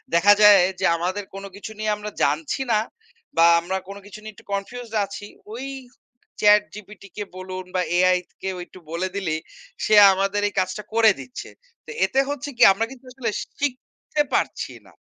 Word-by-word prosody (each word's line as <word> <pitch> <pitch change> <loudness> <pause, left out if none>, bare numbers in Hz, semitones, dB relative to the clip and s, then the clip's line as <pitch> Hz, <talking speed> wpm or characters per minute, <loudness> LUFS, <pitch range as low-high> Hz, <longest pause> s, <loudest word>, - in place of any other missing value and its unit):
দেখা 205 +4 +7
যায়, 205 -2 +8 0.2
যে - - 0
আমাদের 185 +4 -2
কোনো 195 0 -7
কিছু 205 +2 -8
নিয়ে 215 0 0
আমরা 210 0 -7
জানছি 150 - 0
না। 215 - +4 0.6
বা 165 - +7
আমরা 185 +3 -3
কোন 200 - -8
কিছু 205 +1 -11
নিয়ে 215 0 -9
একটু - - -18
কনফিউজড 225 +3 -5
আছি। 200 +1 -9 0.3
ওই 255 +4 -6 0.8
ChatGPT 210 0 +2
কে 210 - -3
বলুন 185 0 -7
বা 185 - +2 0.2
AI 185 0 +4 0.2
কেও 190 -1 -3
একটু 185 - -15
বলে 175 +3 -1
দিলেই, 160 -5 -2 0.5
সে 215 - +1 0.2
আমাদের 195 +2 0
এই 205 - -6
কাজটা 195 +3 -2
করে 225 -1 +6
দিচ্ছে। 255 - -9 0.4
তো - - -9
এতে 265 - 0
হচ্ছে 290 0 -4
কি? - - +5
আমরা 225 +3 -1
কিন্তু 265 -1 -13
আসলে 250 -3 -3 0.3
শিখতে 290 +2 -3
পারছি - - -1
না - - -19
205 Hz, 175 wpm, -23 LUFS, 185-220 Hz, 0.8 s, যায়